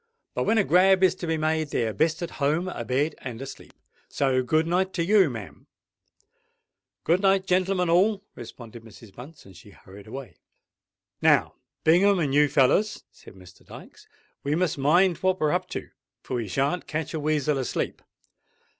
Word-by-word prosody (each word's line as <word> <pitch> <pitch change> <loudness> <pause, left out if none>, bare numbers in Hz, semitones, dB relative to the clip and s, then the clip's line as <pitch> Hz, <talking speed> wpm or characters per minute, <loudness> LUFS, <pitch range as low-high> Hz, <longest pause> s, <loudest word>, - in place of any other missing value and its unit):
But - - -2
when 225 - +2
a 210 - +4
grab 190 +1 +4
is 185 -1 +5
to 180 -2 -7
be 160 0 0
made, 155 0 -1
they're 115 -5 -1
best 160 +5 0
at 170 - -5
home, 155 +6 +1
a 120 - -5
bed 135 +6 0
and 120 -3 -7
asleep. 135 0 -10 0.4
So 130 -2 +1
good 155 +5 +1
night 185 +3 0
to 170 - -1
you, 195 -3 +4
ma'am." 110 -6 -9 1.4
"Good 175 +3 +2
night, 195 -1 +2
gentlemen 185 0 +1
all," 195 +4 +2
responded 120 0 -11
Mrs. 110 -2 -15
Bunce; 145 +6 -13
and 95 -2 -15
she 95 +3 -15
hurried 100 0 -15
away. 135 +3 -9 0.8
"Now, - - +3 0.3
Bingham 190 +5 +4
and 150 -6 -1
you 150 +1 +5
fellers," 155 +10 +2
said - - -16
Mr. 90 -1 -17
Dykes, - - -14 0.4
"we 145 +2 0
must 175 -1 0
mind 170 +5 +3
what 185 0 0
we're 155 -1 +1
up - - -1
to; - - -7 0.3
for 125 - -4
we 115 -3 -4
shan't 140 - -1
catch 155 +1 -4
a 160 - -2
weasel 150 -1 0
asleep. 130 - -3
155 Hz, 175 wpm, -25 LUFS, 130-180 Hz, 1.4 s, is